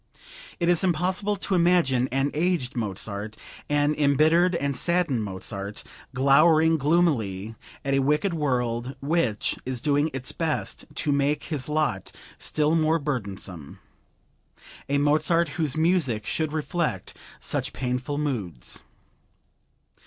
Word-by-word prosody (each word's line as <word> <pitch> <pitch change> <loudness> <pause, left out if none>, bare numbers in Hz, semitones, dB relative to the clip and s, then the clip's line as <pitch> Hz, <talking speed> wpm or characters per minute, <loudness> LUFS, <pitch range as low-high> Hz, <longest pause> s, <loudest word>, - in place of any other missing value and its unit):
It 170 - +1
is 175 +1 +3
impossible 185 +4 +1
to 195 - -2
imagine 170 -8 +3
an 135 +2 0
aged 160 -5 0
Mozart, 105 -1 -4 0.3
an 145 0 +2
embittered 155 +5 +3
and 140 -4 -1
saddened 170 -8 +1
Mozart, 100 +1 -5 0.3
glowering 155 +4 +4
gloomily 130 - +1 0.3
at 140 - 0
a 135 - +3
wicked 150 +7 +1
world 125 -4 -1
which 140 -8 0
is 130 -1 -3
doing 145 +3 +2
its 130 -1 -3
best 160 -2 -2
to 150 +1 0
make 140 +1 +1
his 150 -3 -4
lot 150 -11 -1 0.3
still 150 0 0
more 160 0 +3
burdensome; 100 - -4 1.1
a 140 - +2
Mozart 155 +3 +3
whose 155 -2 -2
music 160 - +1
should 155 +4 -1
reflect 160 +2 -2 0.3
such - - -2
painful 125 +2 -3
moods. 105 - -3
145 Hz, 120 wpm, -25 LUFS, 125-160 Hz, 1.1 s, glowering